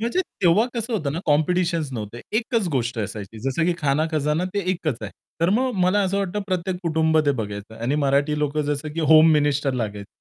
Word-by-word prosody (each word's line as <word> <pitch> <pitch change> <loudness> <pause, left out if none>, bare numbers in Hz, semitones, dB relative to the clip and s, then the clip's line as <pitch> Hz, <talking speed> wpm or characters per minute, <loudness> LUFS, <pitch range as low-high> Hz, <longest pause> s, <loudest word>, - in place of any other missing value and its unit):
म्हणजे 235 +11 0 0.2
तेव्हा 180 +5 +5
कसं 235 0 -3
होतं 155 -11 -1
ना 160 - -3
कॉम्पिटिशन्स 165 0 +1
नव्हते. 115 0 -6 0.2
एकच 230 -3 -1
गोष्ट 120 -2 -1
असायची. 105 0 -5
जसं 150 +5 0
की 175 - +3
खाना 145 +1 +1
खजाना 150 +2 0
ते - - +1
एकच 155 -8 -2
आहे. 105 - -5 0.3
तर 170 +2 +3
मग 255 +6 +2
मला 190 +3 +3
असं 195 +1 0
वाटतं 200 +1 -2
प्रत्येक 185 -1 -2
कुटुंब 160 -1 +2
ते - - +5
बघायचं 105 0 -6
आणि 120 +5 -1
मराठी 140 +2 +2
लोकं 150 0 0
जसं 145 +1 -5
की 165 - -3
होम 155 +1 +6
मिनिस्टर 145 -2 +1
लागायचे. 105 -4 -4
155 Hz, 200 wpm, -23 LUFS, 135-180 Hz, 0.3 s, होम